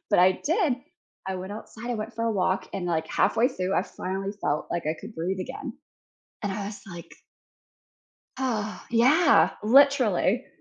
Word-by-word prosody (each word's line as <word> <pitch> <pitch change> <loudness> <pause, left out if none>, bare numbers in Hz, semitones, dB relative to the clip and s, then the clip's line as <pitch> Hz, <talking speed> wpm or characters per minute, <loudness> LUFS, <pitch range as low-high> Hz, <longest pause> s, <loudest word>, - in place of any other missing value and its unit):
but - - +4
I 185 +1 +6
did. 325 - +2 0.5
I 190 - -2
went 185 +2 -6
outside, 220 +2 -8
I - - 0
went 220 +1 -5
for 230 0 -2
a 225 - +1
walk, 185 -1 0
and, 190 -2 -3
like, 160 -2 0
halfway 235 +3 +3
through 190 -7 -2
I - - +3
finally 195 +2 -4
felt, 150 +1 0
like, 170 -2 -2
I 155 - 0
could 220 - -10
breathe 185 +3 -2
again, - - -6 0.7
and 200 -2 -1
I 200 0 -4
was 205 0 -7
like 175 -3 -10 1.3
Oh, 220 -5 -2
yeah, 280 +7 +5
literally, 250 -2 +4
210 Hz, 170 wpm, -26 LUFS, 185-240 Hz, 1.3 s, I